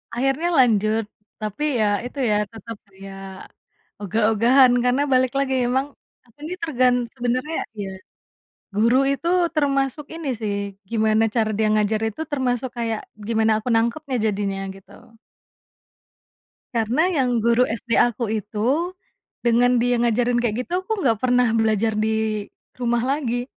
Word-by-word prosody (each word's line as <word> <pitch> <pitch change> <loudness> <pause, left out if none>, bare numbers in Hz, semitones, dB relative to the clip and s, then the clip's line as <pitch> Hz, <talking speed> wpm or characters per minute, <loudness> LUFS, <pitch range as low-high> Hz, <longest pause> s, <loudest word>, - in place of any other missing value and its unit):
Akhirnya 270 +6 0
lanjut, 220 -2 +3 0.4
tapi 215 +8 -4 0.2
ya 215 - +3 0.2
itu 275 +3 -7
ya - - +3 0.2
tetap 225 0 -9
kayak, 195 0 -11 0.8
ogah-ogahan 225 +5 +4
karena 250 +3 +2
balik 255 -1 +3
lagi 265 -1 0
emang, 265 +2 +1 0.4
aku 235 +2 -28
ini 335 +4 -4
tergan 255 -6 +2 0.2
sebenarnya 255 +6 -2 0.3
ya, 195 - -5 0.9
guru 230 +4 +3
itu 280 +5 -3 0.3
termasuk 275 -1 0
ini 325 -3 -6
sih 205 -2 -1 0.4
gimana 220 0 +2
cara 220 -2 +2
dia 220 -1 +2
ngajar 215 0 +1
itu 220 - -8
termasuk 255 -2 -1
kayak 225 -2 -1 0.3
gimana 220 -1 +2
aku 220 - -11
nangkapnya 255 +4 0
jadinya 200 -2 -1 0.2
gitu. 195 - -17 1.8
Karena 230 +6 +1
yang 250 -8 +1
guru 235 +2 +3
SD 230 +1 -1
aku 235 -2 +1
itu, 230 - -1 0.5
dengan 245 +1 +3
dia 245 0 +2
ngajarin 240 +1 +2
kayak 240 +1 -1
gitu 360 +5 -2
aku 435 -3 -2
nggak 225 -5 +2
pernah 250 -2 +2
belajar 220 -1 +2
di, 220 -1 -1 0.3
rumah 240 -1 0
lagi. 250 -3 -1
235 Hz, 135 wpm, -22 LUFS, 220-260 Hz, 1.8 s, ogah-ogahan